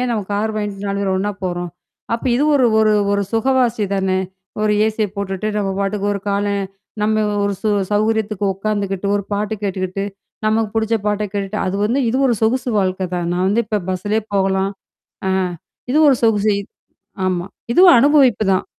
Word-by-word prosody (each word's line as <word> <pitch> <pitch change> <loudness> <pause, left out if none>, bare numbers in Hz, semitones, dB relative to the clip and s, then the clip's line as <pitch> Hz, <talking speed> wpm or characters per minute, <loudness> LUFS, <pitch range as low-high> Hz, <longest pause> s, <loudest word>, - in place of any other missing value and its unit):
ஏன் 250 -1 0
நம்ம 215 -3 0
கார் 210 +2 0
வாங்கிட்டு 205 -1 -4
4 200 0 -1
பேர் 190 -1 0
ஒண்ணா 205 +2 0
போறோம். 175 -1 -3 0.4
அப்ப 230 - -5
இது 275 +5 +2
ஒரு 260 -3 +4
ஒரு 215 -1 +4 0.2
ஒரு 200 0 +1
சுகவாசி 240 -1 +2
தானே. 190 -1 +1 0.4
ஒரு 210 0 +2
ஏசி 220 0 0
போட்டுட்டு 200 +1 -3
நம்ம 200 -2 0
பாட்டுக்கு 200 0 -1
ஒரு 200 - -3
கால 200 +1 0 0.6
நம்ம 215 0 +2 0.2
ஒரு 200 - 0
சு 215 - +1 0.2
சௌகரியத்துக்கு 215 -1 0
உட்காந்துக்கிட்டு, 200 -1 -2
ஒரு 200 - -2
பாட்டு 210 +1 -1
கேட்டுக்கிட்டு, 190 0 -2 0.4
நமக்கு 215 0 +1
புடிச்ச 225 0 +1
பாட்ட 210 0 0
கேட்டுட்டு 200 +1 -3
அது 185 - -1
வந்து 245 +6 +1
இது 240 - 0
ஒரு 240 - +2
சொகுசு 245 +3 +1
வாழ்க்கை 185 -1 0
தான். 175 -1 -2
நான் 180 +1 0
வந்து 225 +4 +2
இப்ப 210 -1 -1
பஸ்லயே 205 +4 -1
போகலாம். 195 0 +1 0.6
ஆ - - +1 0.6
இது 300 - +3
ஒரு 270 - +5
சொகுசு 210 -2 +3 0.7
ஆமா. 180 -1 -1 0.3
இதுவும் 360 -4 +8
அனுபவிப்பு 270 -6 +4
தான். 185 - 0
205 Hz, 170 wpm, -19 LUFS, 195-220 Hz, 0.7 s, இதுவும்